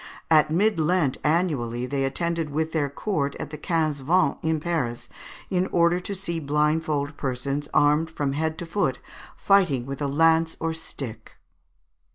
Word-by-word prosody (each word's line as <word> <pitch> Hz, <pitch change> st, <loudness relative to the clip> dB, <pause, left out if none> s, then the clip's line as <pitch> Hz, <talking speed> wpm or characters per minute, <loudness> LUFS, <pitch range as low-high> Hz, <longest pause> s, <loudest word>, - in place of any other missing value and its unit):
At 155 Hz, -1 st, +5 dB
Mid 185 Hz, +3 st, +2 dB
Lent 160 Hz, -3 st, +2 dB
annually 145 Hz, -8 st, 0 dB
they 135 Hz, +1 st, -1 dB
attended 165 Hz, +3 st, -1 dB
with 160 Hz, +2 st, -1 dB
their 150 Hz, -3 st, 0 dB
court 140 Hz, -2 st, -2 dB
at 145 Hz, -, -6 dB
the 150 Hz, -, -6 dB
Quinze 155 Hz, -4 st, 0 dB
Vingts, 175 Hz, +7 st, +2 dB
in 160 Hz, -1 st, 0 dB
Paris, 150 Hz, -8 st, -2 dB, 0.4 s
in 185 Hz, 0 st, +1 dB
order 170 Hz, +1 st, +3 dB
to 200 Hz, +2 st, -5 dB
see 170 Hz, -3 st, -3 dB
blindfold 150 Hz, 0 st, 0 dB
persons, 140 Hz, +2 st, -2 dB
armed 150 Hz, +2 st, +3 dB
from 145 Hz, -3 st, -2 dB
head 160 Hz, +2 st, -1 dB
to 175 Hz, -, -5 dB
foot, 165 Hz, -7 st, 0 dB, 0.4 s
fighting 175 Hz, -11 st, +3 dB
with 135 Hz, +2 st, -6 dB
a 145 Hz, -, 0 dB
lance 160 Hz, +3 st, +3 dB
or 165 Hz, 0 st, -1 dB
stick. 120 Hz, -8 st, -7 dB
155 Hz, 160 wpm, -25 LUFS, 140-170 Hz, 0.4 s, At